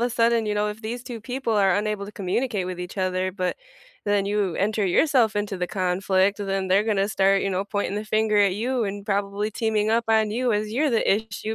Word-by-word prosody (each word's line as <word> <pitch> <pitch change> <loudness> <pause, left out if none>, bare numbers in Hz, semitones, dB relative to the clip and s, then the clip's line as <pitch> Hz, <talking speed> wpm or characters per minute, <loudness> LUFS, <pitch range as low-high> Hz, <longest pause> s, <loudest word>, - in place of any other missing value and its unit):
a 240 +1 +1
sudden, 230 -1 +2
you 210 - 0
know, 210 0 0
if 210 +1 -6
these 235 +2 -5
2 240 -3 -7
people 250 +1 -3
are 195 -3 +3
unable 210 -1 -2
to 210 - -10
communicate 200 +1 -2
with 180 -1 -5
each 180 +3 -7
other, 185 0 0
but, 185 -1 -2 0.5
then 205 -1 +2
you 200 -4 0
enter 205 0 0
yourself 230 - +3
into 205 -2 -2
the 180 - -1
conflict, 190 +1 +1
then 195 -1 -2
they're 195 +3 +3
gonna 200 -3 +1
start, 195 -2 +2
you 195 - -1
know, 185 +1 0
pointing 205 -1 -2
the 210 - -3
finger 215 -1 +1
at 200 -2 +4
you 245 +3 -1
and 200 0 -5
probably 200 0 -1
teaming 220 -1 0
up 230 +1 +2
on 220 -1 +3
you, 240 0 0
as 210 +1 -2
you're 295 +5 +1
the 230 -3 +1
issue 220 0 -5
210 Hz, 230 wpm, -24 LUFS, 195-220 Hz, 0.5 s, at